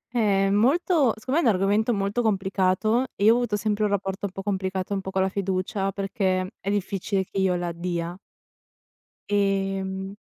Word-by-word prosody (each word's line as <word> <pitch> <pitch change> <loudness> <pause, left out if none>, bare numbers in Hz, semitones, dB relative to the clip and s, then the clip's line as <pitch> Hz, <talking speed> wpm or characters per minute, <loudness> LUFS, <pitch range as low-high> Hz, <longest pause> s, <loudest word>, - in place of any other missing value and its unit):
Eh, 195 -3 +2
molto 275 - +3
secondo 265 +9 0
me 250 - +2
è - - +6
un 200 - +3
argomento 205 +5 +2
molto 200 +2 0
complicato, 195 +3 +1
e 200 - -3
io 220 - +7
ho 240 - +2
avuto 240 -4 0
sempre 210 0 -1
un - - +1
rapporto 195 0 -2
un - - -11
po' 195 +1 -7
complicato 190 -1 -2
un 195 - -1
po' 190 - -6
con 190 0 +1
la 190 - +1
fiducia 195 0 -1
perché 190 -1 -1
è 195 - -4
difficile 195 -1 -1
che 195 - -5
io 190 -2 +2
la 175 -1 -2
dia. 170 0 -3 1.1
Ehm 195 -1 -1
195 Hz, 185 wpm, -25 LUFS, 190-210 Hz, 1.1 s, io